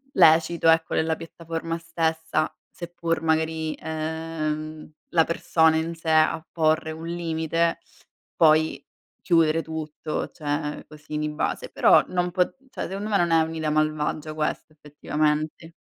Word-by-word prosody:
lecito 165 -1 +5
ecco 160 0 +3
nella 160 0 +1
piattaforma 165 0 -5
stessa, 160 -1 -1 0.2
seppur 170 -2 -3
magari, 160 0 0
uhm, 155 -1 -4 0.2
la 165 -2 +4
persona 160 -1 +2
in 165 +1 -1
sé 165 0 -4
a 155 0 +3
porre 160 -1 +1
un 160 +1 -7
limite, 165 0 -1 0.6
poi 155 -3 +3 0.4
chiudere 165 -2 +3
tutto, 155 -1 -4
cioè 150 0 -3
così 150 0 -8
di 150 0 -1
base. 325 - -2
Però - - +5
non 180 -1 -1
po 180 -1 +1 0.2
cioè - - -5
secondo 200 +3 -4
me, 200 -2 +2
non 170 -1 +2
è 165 0 +5
un'idea 160 -1 -2
malvagia 155 0 -1
questa 155 0 -3
effettivamente. 150 +2 -2
160 Hz, 130 wpm, -25 LUFS, 155-165 Hz, 0.6 s, lecito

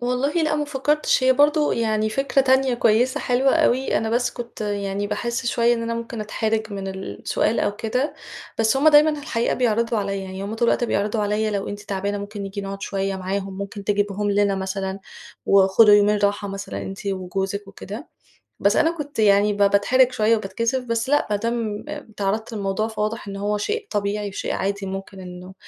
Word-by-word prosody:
والله 250 +4 0
لأ، 310 -1 +1
ما 295 - 0
فكّرتش 290 -1 +1
هي 260 - +6
برضه 295 +2 +3
يعني 215 -2 0
فكرة 275 +3 +1
تانية 265 -1 +3
كويسة 240 +5 +2
حلوة 255 +2 +2
أوي، 270 -5 +2
أنا 220 - -2
بس 245 +1 +1
كنت 235 -1 -9
يعني 205 -1 -2
باحس 235 +4 -3
شوية 240 0 +3
إن 230 - -3
أنا 230 0 -2
ممكن 230 0 -5
أتحرِج 220 0 -2
من 195 -1 -4
السؤال 190 +3 -2
أو 205 - -1
كده، 250 +7 -1 0.4
بس 225 +3 +3
هم 285 +3 +5
دايمًا 300 0 +6
في 295 - -7
الحقيقة 230 -4 0
بيعرضوا 230 -1 +1
عليَّ، 195 -1 -2
يعني 190 +1 -6
هم 205 +2 -4
طول 235 +1 +1
الوقت - - +2
بيعرضوا 210 -1 0
عليَّ 210 +1 0
لو 200 -2 -2
أنتِ 205 0 -6
تعبانة 200 0 -3
ممكن 205 0 -6
نيجي 195 +1 -5
نقعد 195 0 -6
شوية 195 -1 -2
معاهم، 190 +1 -4
ممكن 200 0 -6
تجيبيهم 205 0 0
لنا 200 0 +2
مثلًا، 190 0 -3 0.5
وخدوا 200 +2 +6
يومين 205 0 +4
راحة 205 0 0
مثلًا 195 0 -5
أنتِ 195 +1 -7
وجوزِك 195 +1 -3
وكده، 210 - -8 0.5
بس 200 +1 +3
أنا 325 - +4
كنت 295 -6 -7
يعني 205 -1 +4
ب 205 - -5
باتحرِج 205 +6 +4
شوية 225 -1 +3
وباتكسف، 230 +5 -2
بس 230 0 -1
لأ 290 +1 +2
ما 205 - +2
دام 225 -1 -2
اتعرّضت 215 +1 -3
للموضوع 200 +1 -1
فواضح 215 -1 -3
إن 195 - -6
هو 205 +1 -1
شيء 425 - -2
طبيعي 205 0 -1
وشيء 195 - -4
عادي 200 +1 -2
ممكن 195 0 -6
إنه 180 0 -10
210 Hz, 190 wpm, -22 LUFS, 200-240 Hz, 0.5 s, هي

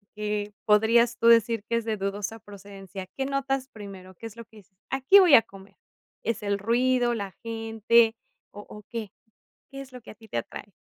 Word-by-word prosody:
que 210 -1 -3
podrías 230 +3 +4
tú 230 - +2
decir 230 -2 +4
que 230 - +1
es 230 - -3
de 220 -2 -2
dudosa 205 +3 -4
procedencia? 195 -1 -10
¿Qué 270 - -1
notas 270 -1 -2
primero? 195 -4 -11
¿Qué 225 - -12
es 225 - -13
lo 230 - -9
que 220 0 -20
dices? 190 -2 -20
"Aquí 270 +10 +6
voy 350 -7 +7
a 225 - +8
comer". 195 -2 -16 0.5
¿Es 225 -2 -2
el 200 0 0
ruido, 240 +2 +2
la 200 -3 -5
gente, 225 0 +2 0.4
o 205 - -10
o 210 0 -11
qué? 225 -4 -6 0.6
¿Qué 275 0 -7
es 270 -1 -12
lo 250 - -10
que - - -12
a - - -15
ti 220 0 -17
te - - -3
atrae? 205 - -9
225 Hz, 205 wpm, -26 LUFS, 205-235 Hz, 0.6 s, a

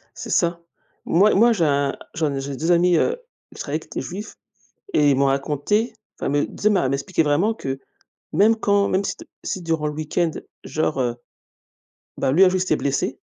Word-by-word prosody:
C'est - - -7
ça. 170 0 +1 0.4
Moi, 200 +6 +4
moi, 235 +4 +5
j'ai 185 -7 +1
un 140 -2 +1 0.2
j'en 150 -4 -1
j'ai 135 0 -5
2 165 +5 -1
amis, 175 0 +4
heu, 465 - +2 0.4
je - - -13
travaille 155 +2 -3
avec - - -17
des - - -2
juifs 190 +10 -7 0.6
et 145 -1 +5
ils 135 - +3
m'ont 140 +1 +3
raconté, 145 - 0 0.3
enfin, - - -2
mais, 145 +1 +1
tu - - -14
sais, - - -3
elle - - +2
m'a 185 - +2
elle 130 - 0
m'expliquait 140 +5 0
vraiment 160 +9 +2
que 135 -9 -4 0.5
même 220 +3 +4
quand 200 -2 +2
même 190 +2 +1
si - - -3
t - - -13 0.2
si, 185 - -3
durant 160 -2 -1
le 150 - -3
week-end, 155 +2 -1 0.3
genre, 155 -3 -1
heu, 120 -2 0 1.0
bah, 130 - +1
lui, 175 +8 +6
un - - +5
jour, 185 - 0
il - - -1
s'était 185 - +1
blessé, 140 -1 -1
160 Hz, 215 wpm, -22 LUFS, 140-190 Hz, 1.0 s, lui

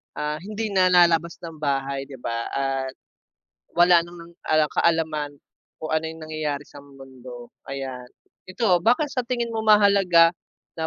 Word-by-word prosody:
ah, 150 0 -3
hindi 215 +3 -5
nalalabas 175 -3 +3
ng 165 -2 -8
bahay 140 -2 -2
'di 135 - -11
ba? 115 0 -3
At 135 -1 -2 0.8
wala 175 0 +5
ng 170 0 -13 0.3
kaalaman 160 -3 0 0.5
kung 155 - -5
ano 160 0 0
yung 160 0 -8
nangyayari 155 -2 -3
sa 145 - -13
mundo 130 -3 -12 0.2
ayan. 135 -2 -6 0.4
Ito, 185 -2 +2
bakit 250 +6 +3
sa 255 - -2
tingin 240 -2 -2
mo 220 - -1
mahalaga 200 -5 +5 0.5
na 160 - -1
160 Hz, 140 wpm, -23 LUFS, 140-180 Hz, 0.8 s, wala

